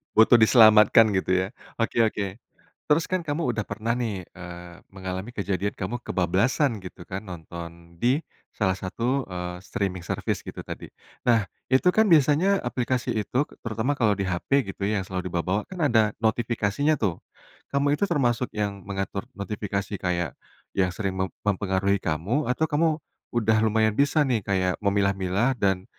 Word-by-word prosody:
Butuh 110 Hz, +2 st, +7 dB
diselamatkan 110 Hz, -1 st, +7 dB
gitu 95 Hz, 0 st, 0 dB
ya, -, -, -5 dB, 0.3 s
oke 115 Hz, -, -1 dB
oke. 100 Hz, -2 st, -2 dB, 0.6 s
Terus 160 Hz, +2 st, +4 dB
kan 185 Hz, 0 st, -1 dB
kamu 150 Hz, -4 st, -1 dB
udah 110 Hz, -2 st, -2 dB
pernah 110 Hz, +3 st, -2 dB
nih, 110 Hz, -6 st, -2 dB
eee, 85 Hz, 0 st, -10 dB
mengalami 95 Hz, +1 st, -6 dB
kejadian 100 Hz, -1 st, -2 dB
kamu 110 Hz, +6 st, -4 dB
kebablasan 110 Hz, -, +1 dB
gitu 90 Hz, -1 st, -10 dB
kan 95 Hz, +2 st, -5 dB
nonton 85 Hz, 0 st, -9 dB
di 130 Hz, +5 st, +3 dB, 0.4 s
salah 95 Hz, -3 st, +2 dB
satu, 120 Hz, +8 st, -2 dB
eee, 90 Hz, -1 st, -5 dB
streaming 95 Hz, -1 st, -3 dB
service 85 Hz, -, -2 dB
gitu -, -, -8 dB
tadi. -, -, -7 dB, 0.4 s
Nah, 115 Hz, -3 st, +4 dB, 0.2 s
itu 130 Hz, +1 st, +3 dB
kan 220 Hz, +1 st, +4 dB
biasanya 165 Hz, +5 st, +4 dB
aplikasi 125 Hz, 0 st, -1 dB
itu, 115 Hz, +6 st, 0 dB, 0.2 s
terutama 115 Hz, +4 st, -1 dB
kalau 110 Hz, -7 st, +2 dB
di 100 Hz, -, -1 dB
HP 95 Hz, +5 st, 0 dB
gitu 100 Hz, +1 st, -3 dB
yang 105 Hz, -3 st, 0 dB
selalu 90 Hz, -1 st, -4 dB
diba 85 Hz, -1 st, -2 dB
bawa, 100 Hz, +3 st, 0 dB
kan 180 Hz, -4 st, -2 dB
ada 110 Hz, -6 st, +3 dB
notifikasinya 115 Hz, +5 st, +1 dB
tuh. 100 Hz, -, -1 dB, 0.5 s
Kamu 140 Hz, +1 st, +1 dB
itu 175 Hz, +7 st, +1 dB
termasuk 125 Hz, -6 st, +1 dB
yang 100 Hz, -1 st, -2 dB
mengatur 100 Hz, +2 st, -3 dB
notifikasi 100 Hz, 0 st, -4 dB
kayak 85 Hz, -4 st, -1 dB, 0.4 s
yang 95 Hz, -2 st, +2 dB
sering 95 Hz, +1 st, -2 dB
mem 95 Hz, -, +1 dB, 0.2 s
mempengaruhi 100 Hz, -1 st, +1 dB
kamu? 95 Hz, -, -1 dB
Atau 125 Hz, +5 st, +1 dB
kamu 160 Hz, +1 st, +2 dB, 0.4 s
udah 110 Hz, -1 st, +3 dB
lumayan 110 Hz, 0 st, +2 dB
bisa 145 Hz, +6 st, +3 dB
nih 125 Hz, -5 st, +1 dB
kayak 95 Hz, -2 st, 0 dB
memilah-milah 100 Hz, +3 st, +1 dB
dan, 95 Hz, -2 st, +1 dB
105 Hz, 155 wpm, -25 LUFS, 95-125 Hz, 0.6 s, Butuh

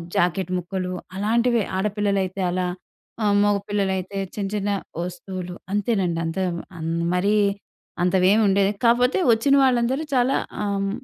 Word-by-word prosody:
Jacket 180 Hz, +1 st, +1 dB
ముక్కలు 180 Hz, +1 st, -3 dB, 0.2 s
అలాంటివే 230 Hz, +3 st, +2 dB
ఆడపిల్లలైతే 200 Hz, -1 st, -1 dB
అలా 180 Hz, 0 st, -1 dB, 0.6 s
ఆహ్, 205 Hz, -1 st, +3 dB
మగపిల్లలైతే 200 Hz, -2 st, -1 dB, 0.2 s
చిన్న 200 Hz, -2 st, -2 dB
చిన్న 205 Hz, 0 st, -1 dB, 0.3 s
వస్తువులు 180 Hz, 0 st, -6 dB, 0.2 s
అంతేనండి. 195 Hz, -5 st, 0 dB
అంత 165 Hz, +2 st, -4 dB, 0.4 s
అన్ 160 Hz, +1 st, -3 dB, 0.2 s
మరీ 200 Hz, +4 st, +2 dB, 0.7 s
అంతవేమి 185 Hz, +4 st, +4 dB
ఉండేది. 195 Hz, 0 st, +3 dB
కాపోతే 245 Hz, +6 st, +4 dB
వచ్చిన 250 Hz, +5 st, +2 dB
వాళ్ళందరూ 260 Hz, +2 st, +2 dB
చాలా 255 Hz, +2 st, +3 dB, 0.3 s
ఆహ్, 200 Hz, -1 st, -1 dB
200 Hz, 115 wpm, -23 LUFS, 185-215 Hz, 0.7 s, అంతవేమి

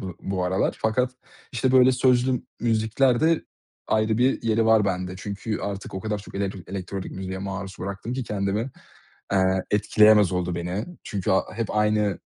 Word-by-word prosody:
bu 95 Hz, -3 st, -6 dB
bu 95 Hz, -2 st, -2 dB
aralar 95 Hz, +2 st, 0 dB
fakat, 125 Hz, +3 st, +1 dB, 0.4 s
işte, 125 Hz, +2 st, +1 dB
böyle 130 Hz, 0 st, +6 dB
sözlü 125 Hz, 0 st, +2 dB, 0.2 s
müzikler 120 Hz, +2 st, +2 dB
de 165 Hz, 0 st, +2 dB, 0.4 s
ayrı 110 Hz, +1 st, +1 dB
bir 130 Hz, +2 st, +2 dB
yeri 115 Hz, -1 st, +2 dB
var 110 Hz, -2 st, +5 dB
bende. 90 Hz, -1 st, -2 dB
Çünkü 100 Hz, +3 st, -4 dB
artık 100 Hz, -1 st, -5 dB
o 95 Hz, -, -3 dB
kadar 105 Hz, 0 st, -2 dB
çok 100 Hz, -, -12 dB
elektr 100 Hz, 0 st, -2 dB
elektronik 95 Hz, 0 st, -5 dB
müziğe 95 Hz, 0 st, -5 dB
maruz 95 Hz, 0 st, -5 dB
bıraktım 100 Hz, +5 st, -5 dB
ki 130 Hz, 0 st, -3 dB
kendimi, 105 Hz, +4 st, -2 dB, 0.6 s
eee, 95 Hz, -1 st, +2 dB
etkileyemez 105 Hz, -1 st, +5 dB
oldu 90 Hz, -1 st, -1 dB
beni. 90 Hz, +5 st, -3 dB, 0.2 s
Çünkü 100 Hz, -3 st, -2 dB
a 95 Hz, -, +4 dB
hep 115 Hz, -1 st, -3 dB
aynı 105 Hz, -2 st, +2 dB
105 Hz, 165 wpm, -24 LUFS, 95-115 Hz, 0.6 s, böyle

